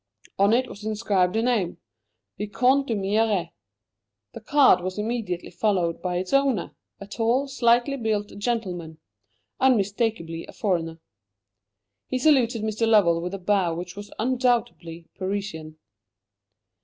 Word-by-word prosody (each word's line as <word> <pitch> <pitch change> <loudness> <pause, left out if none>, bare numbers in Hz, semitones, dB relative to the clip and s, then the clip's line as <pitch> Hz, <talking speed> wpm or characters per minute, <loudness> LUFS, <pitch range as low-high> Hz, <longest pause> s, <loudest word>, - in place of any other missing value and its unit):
On 200 +1 +4
it 250 +3 +2
was 205 - -11
inscribed 205 -4 0
a 225 - +1
name 225 -8 0 0.6
Vicomte 255 +6 +2
d'Humières. 205 -4 0 0.8
The - - -9
card 280 - +4
was 185 +2 -4
immediately 210 -5 -3
followed 180 -6 0
by 180 -1 -2
its 185 +5 -4
owner, 275 -4 +1 0.2
a 200 - -8
tall, 235 +6 0
slightly 245 +1 +2
built 215 -4 -2
gentleman; 185 -8 -3 0.6
unmistakably 205 -8 0
a - - -12
foreigner. 165 -5 -2 1.1
He 260 - -1
saluted 250 -5 +3
Mr. 220 +1 0
Lovell 180 -7 +4
with 180 +3 -4
a - - -4
bow 185 -3 +1
which 175 +1 -7
was 205 0 -9
undoubtedly 235 -9 -1
Parisian. 185 -5 -4
210 Hz, 125 wpm, -24 LUFS, 180-235 Hz, 1.1 s, On